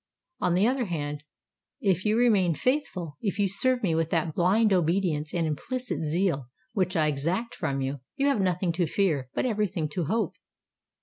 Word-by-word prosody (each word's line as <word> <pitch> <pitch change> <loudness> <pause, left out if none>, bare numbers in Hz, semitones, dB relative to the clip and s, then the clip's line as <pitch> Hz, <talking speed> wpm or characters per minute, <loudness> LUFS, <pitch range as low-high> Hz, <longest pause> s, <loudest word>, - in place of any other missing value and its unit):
On 180 - +1
the 195 +5 +4
other 255 -1 +1
hand, 150 -5 -4 0.6
if 190 - +1
you 215 +1 +3
remain 200 -9 +3
faithful—if 200 - -2
you 205 -1 +2
serve 245 +6 +2
me 175 -5 +2
with 165 0 0
that 165 -2 0
blind 200 +6 +3
obedience 170 -3 +1
and 170 -2 0
implicit 245 - -3
zeal 155 -4 0 0.3
which 185 -4 0
I 155 -2 +3
exact 165 +11 -1
from 135 0 -2
you, 135 +1 -2 0.2
you 275 -1 0
have 275 -7 +2
nothing 180 -1 +1
to 170 0 0
fear, 150 -8 0
but - - 0
every 215 -4 +1
thing 165 -4 -2
to 170 +2 -2
hope." 225 +9 0
180 Hz, 180 wpm, -27 LUFS, 155-210 Hz, 0.6 s, the